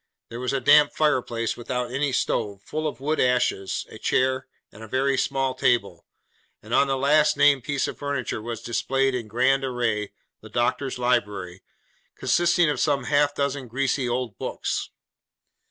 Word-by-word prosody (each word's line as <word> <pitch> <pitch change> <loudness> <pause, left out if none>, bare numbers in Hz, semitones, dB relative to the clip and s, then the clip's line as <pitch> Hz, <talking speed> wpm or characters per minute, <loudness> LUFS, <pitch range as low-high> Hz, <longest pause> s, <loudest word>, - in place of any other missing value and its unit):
There 115 - -7
was 125 +1 -2
a 135 - 0
damp 150 +2 +5
fireplace 125 -6 0
without 120 0 -4
any 140 +2 0
stove, 105 -5 -1
full 155 +6 -3
of 150 - -5
wood 150 +3 -1
ashes; 120 -6 +1
a - - -12
chair, 130 0 0 0.2
and 105 - -14
a 110 - -8
very 135 +4 +1
small 135 0 0
table; 100 -11 0 0.6
and - - -7
on 140 - +4
the 135 -1 0
last 150 +3 +3
named 140 -3 +4
piece 145 -3 -1
of - - -7
furniture 140 -6 -3
was 115 0 -6
displayed, 135 +3 0
in 120 -3 -3
grand 130 +5 +2
array, 120 -5 -1 0.3
the - - -12
doctor's 125 +3 -1
library, 100 -7 -1 0.5
consisting 175 -1 +2
of 150 - -1
some 140 -3 +1
half 145 +2 +2
dozen 140 -2 -2
greasy 130 +1 -1
old 120 -5 -3
books. - - -3
130 Hz, 165 wpm, -24 LUFS, 120-140 Hz, 0.6 s, damp